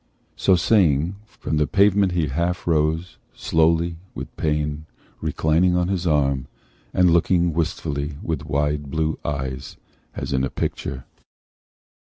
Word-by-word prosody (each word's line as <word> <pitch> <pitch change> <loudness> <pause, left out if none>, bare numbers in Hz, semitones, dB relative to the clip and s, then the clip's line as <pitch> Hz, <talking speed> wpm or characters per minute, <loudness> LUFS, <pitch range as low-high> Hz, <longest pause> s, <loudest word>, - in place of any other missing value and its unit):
So 95 - +4
saying, 85 -2 +2
from 80 - -4
the 75 -1 +2
pavement 100 -1 +3
he 85 -3 +1
half 85 +6 -1
rose, 80 +2 0 0.2
Slowly, 80 +1 +2 0.2
with - - -7
pain, 75 0 -1 0.3
reclining 85 +3 +2
on 90 0 +1
his 90 -2 -1
arm, 70 -4 +1 0.4
And 90 -1 +4
looking 85 0 +3
wistfully 75 -3 -2
with 80 -3 -2
wide 75 0 -1
blue 80 +2 -1
eyes 65 -2 -4 0.4
As - - -4
in 65 0 +1
a 65 - 0
picture. 65 -1 -4
80 Hz, 130 wpm, -23 LUFS, 75-85 Hz, 0.4 s, So